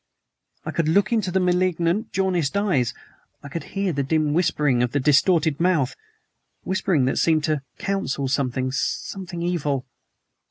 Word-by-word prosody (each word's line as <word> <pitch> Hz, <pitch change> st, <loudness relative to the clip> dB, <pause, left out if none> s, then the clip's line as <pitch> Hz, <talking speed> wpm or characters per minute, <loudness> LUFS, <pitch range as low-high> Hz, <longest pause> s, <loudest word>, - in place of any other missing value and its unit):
I -, -, -3 dB
could 165 Hz, -2 st, 0 dB
look 200 Hz, +8 st, +3 dB
into 215 Hz, -5 st, +1 dB
the 190 Hz, +1 st, +1 dB
malignant, 180 Hz, +1 st, +1 dB
jaundiced 185 Hz, -4 st, 0 dB
eyes; 175 Hz, -, +1 dB, 0.5 s
I 140 Hz, -, -8 dB
could 160 Hz, 0 st, -5 dB
hear 195 Hz, -3 st, 0 dB
the 140 Hz, -, 0 dB
dim 150 Hz, +1 st, +1 dB
whispering 150 Hz, -6 st, +2 dB
of 125 Hz, 0 st, 0 dB
the 145 Hz, -, +2 dB
distorted 150 Hz, +2 st, +3 dB
mouth 165 Hz, -7 st, +1 dB, 0.7 s
whispering 190 Hz, -7 st, +1 dB
that 130 Hz, -, 0 dB
seemed 160 Hz, -2 st, +2 dB
to 155 Hz, -2 st, 0 dB, 0.2 s
counsel 195 Hz, -8 st, -2 dB
something 130 Hz, -1 st, -1 dB
something 175 Hz, +6 st, -3 dB
evil. 145 Hz, -7 st, -1 dB
165 Hz, 150 wpm, -23 LUFS, 140-185 Hz, 0.7 s, look